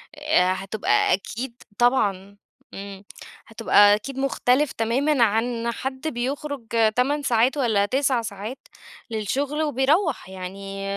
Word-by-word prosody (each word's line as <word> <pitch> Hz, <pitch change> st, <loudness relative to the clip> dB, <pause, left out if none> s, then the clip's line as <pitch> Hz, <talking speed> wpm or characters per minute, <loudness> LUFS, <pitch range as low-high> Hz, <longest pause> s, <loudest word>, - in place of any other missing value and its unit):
آآ 295 Hz, -12 st, +2 dB
هتبقى 195 Hz, +3 st, +1 dB
أكيد 235 Hz, +5 st, -5 dB
طبعًا، 200 Hz, -5 st, +1 dB, 0.4 s
إمم، 195 Hz, 0 st, -8 dB, 0.4 s
هتبقى 205 Hz, -2 st, +5 dB
أكيد 260 Hz, +6 st, -7 dB
مختلِف 270 Hz, +1 st, +1 dB
تمامًا 250 Hz, +4 st, +1 dB
عن 230 Hz, +2 st, 0 dB
حد 260 Hz, +4 st, -5 dB
بيخرُج 275 Hz, 0 st, -4 dB, 0.3 s
8 285 Hz, +4 st, +1 dB
ساعات 245 Hz, +2 st, +2 dB
والّا 220 Hz, -7 st, +2 dB
9 260 Hz, +1 st, +1 dB
ساعات 220 Hz, +3 st, -6 dB, 0.5 s
للشغل، 275 Hz, +8 st, -2 dB
وبيروَّح 295 Hz, -, +1 dB
يعني 195 Hz, +1 st, -7 dB
240 Hz, 110 wpm, -23 LUFS, 205-270 Hz, 0.5 s, هتبقى